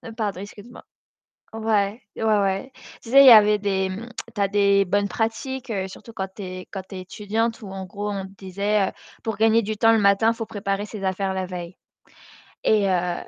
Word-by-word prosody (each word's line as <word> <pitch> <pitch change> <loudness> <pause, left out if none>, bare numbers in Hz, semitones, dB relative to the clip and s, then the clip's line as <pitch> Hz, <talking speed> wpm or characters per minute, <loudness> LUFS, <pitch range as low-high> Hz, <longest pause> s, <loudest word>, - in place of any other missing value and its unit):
pardon 205 -5 -2
excuse 205 +3 -10
moi. - - -12 0.7
Ouais 220 -1 0 0.2
ouais - - -5
ouais. 205 +2 +1 0.3
Tu 230 - -10
sais, 275 +1 +8
il 275 - +7
y - - +11
avait 210 -1 +7
des 190 -2 -1 0.5
tu 205 - -3
as 200 - +4
des 200 -1 +3
bonnes 200 +2 0
pratiques, 240 +5 -3 0.2
surtout 230 +4 -12
quand 190 -3 -4
tu 205 - -7
es 185 -1 -7
quand 195 -2 -5
tu - - -10
es 185 - -5
étudiante, 215 +5 -2
où 195 - -8
en 190 -1 -6
gros, 205 +3 -5
on 195 - -3
te 190 - -10
disait, 200 +2 0
heu, - - -8 0.3
pour 225 -2 -2
gagner 225 +1 +4
du 215 +1 -3
temps 225 +1 +4
le 225 - +4
matin, 200 +2 +4
il - - -10
faut 225 -1 -4
préparer 200 0 -3
ses 210 -2 -8
affaires 190 0 -1
la 185 -1 -2
veille. 180 -1 -7 0.9
Et 210 -2 +3
heu, 180 -1 +1
205 Hz, 210 wpm, -23 LUFS, 190-220 Hz, 0.9 s, y